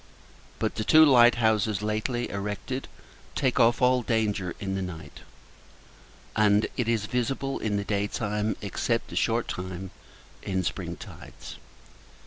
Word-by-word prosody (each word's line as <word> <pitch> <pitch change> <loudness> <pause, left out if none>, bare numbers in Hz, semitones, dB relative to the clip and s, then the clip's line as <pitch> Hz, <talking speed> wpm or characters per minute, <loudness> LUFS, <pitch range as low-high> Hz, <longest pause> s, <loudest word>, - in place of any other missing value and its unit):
But - - -1
the 110 - -3
two 155 +8 +7
light 120 -4 +6
houses 110 -3 +1
lately 110 +3 -1
erected 105 +6 -4 0.5
take 130 -2 +1
off 120 +2 +4
all 125 0 +4
danger 105 -6 -1
in 95 -1 -3
the 95 - -2
night; 90 -3 -7 1.2
and 105 0 +4
[it] 120 -2 -1
is 110 -3 +1
visible 130 +4 -2
in 105 -2 -1
the 100 - -2
day 100 -1 0
time, 105 0 -2
except 115 +3 -1
a - - -6
short 115 +1 +1
time 90 +1 -5 0.5
in 95 -1 -2
spring - - -3
tides. - - -11
110 Hz, 140 wpm, -27 LUFS, 100-120 Hz, 1.2 s, two